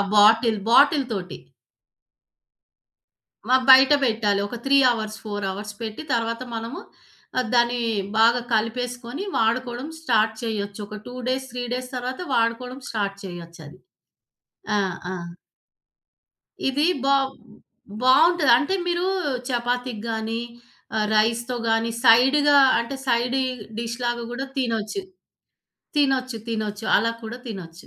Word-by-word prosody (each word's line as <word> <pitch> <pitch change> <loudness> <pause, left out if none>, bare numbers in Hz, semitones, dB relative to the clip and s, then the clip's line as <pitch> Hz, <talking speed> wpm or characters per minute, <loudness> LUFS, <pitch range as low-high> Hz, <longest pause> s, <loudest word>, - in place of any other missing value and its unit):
Bottle 220 +1 +5
బాటిల్‌తోటి. 250 - +3 2.1
మ - - -1 0.2
బయటపెట్టాలి. 260 -7 +5
ఒక 240 - -7
3 275 +1 +4
hours, 215 -2 -4
4 205 -1 -4
hours 210 +2 -7
పెట్టి 220 +4 -5
తర్వాత 230 +1 -1
మనము 230 +10 -5 0.7
దాన్ని 240 0 +2 0.4
బాగా 235 +2 +5
కలిపేసుకొని 245 - -2
వాడుకోవ‌డం 240 +4 -1
స్టార్ట్ 225 -6 +2
చెయ్యొచ్చు. 205 -2 -4
ఒక 215 0 -8
2 245 - -8
డేస్ 260 +1 -1
3 245 0 -4
డేస్ 255 0 -4
తర్వాత 250 +3 -4
వాడుకోవడం 250 +3 -1
స్టార్ట్ 200 -3 -2
చెయ్యొచ్చది. 170 -4 -10 1.0
ఆ! - - +3 0.4
ఆ! - - -4 1.5
ఇది 285 +3 +1 0.2
బావ్ 275 -1 +2 0.7
బావుంటది. 295 +3 +5
అంటే 305 +8 0
మీరు 350 +1 0 0.4
చపాతీకి 245 -2 -2
గాని, 225 0 -2 0.6
ఆహ్, 215 -1 +1
రైస్‌తో 230 +3 +1
గాని 225 +1 +1
సైడ్‌గా 270 +5 +6 0.2
అంటే 235 +4 -4
సైడ్ 245 +2 +1 0.4
డిష్‌లాగా 235 +1 -3
కూడా 265 +3 -4
తినొచ్చు. 235 - -2 0.9
తినొచ్చు, 260 -4 +1
తినొచ్చు 215 -1 -3
అలా 230 +2 +1
కూడా 225 +2 -7
తినొచ్చు. 185 -6 -9
235 Hz, 110 wpm, -23 LUFS, 220-255 Hz, 2.1 s, సైడ్‌గా